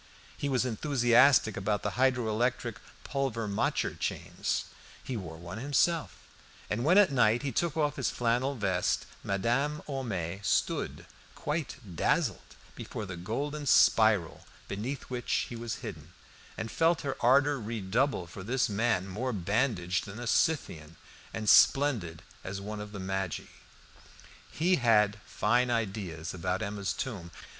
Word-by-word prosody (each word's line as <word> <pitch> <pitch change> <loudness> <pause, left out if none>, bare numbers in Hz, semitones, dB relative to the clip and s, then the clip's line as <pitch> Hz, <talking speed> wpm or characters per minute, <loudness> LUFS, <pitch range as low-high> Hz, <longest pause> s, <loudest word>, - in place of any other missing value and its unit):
He 145 - -3
was 130 -1 +1
enthusiastic 120 -2 +4
about 100 +1 -1
the - - -1
hydro 130 -2 +2
electric 120 0 -1 0.2
Pulvermacher 115 -7 -1
chains; - - -2 0.4
he 130 - -4
wore 85 -7 -6
one 85 +5 -7
himself, 145 - +1 0.6
and 115 +3 0
when 175 +7 +5
at 205 -7 +6
night 120 -1 +3
he 140 - -1
took 165 +5 -1
off 150 -2 +1
his 135 -4 0
flannel 125 +3 0
vest, 95 -6 0 0.2
Madame 120 +10 0
Homais 100 - -3
stood - - -1 0.3
quite 150 0 -3 0.2
dazzled - - 0 0.2
before 105 - -6
the 90 -2 -6
golden 145 - -4
spiral 110 -11 +4 0.2
beneath 120 +8 -4
which 125 -1 -1
he 120 - -6
was 115 -1 -5
hidden, - - -8 0.4
and 110 - -4
felt 165 0 +2
her 140 -1 -3
ardour 140 +3 +4
redouble 110 +1 -1
for 90 +3 -10
this 125 +7 0
man 105 -2 0
more 115 +7 -3
bandaged 100 -2 0
than 100 +2 -8
a 120 - -5
Scythian, 85 - 0 0.4
and 110 -1 -5
splendid 110 - +4 0.2
as 95 +1 -5
one 105 +1 -6
of 105 0 -8
the 100 - -7
Magi. 95 -2 -2 1.1
He 180 +3 +2
had 105 -4 +3
fine 120 +4 +2
ideas 95 -8 -2
about 90 +3 -2
Emma's 100 -2 -2
tomb. 100 -10 -5
115 Hz, 140 wpm, -30 LUFS, 100-135 Hz, 1.1 s, at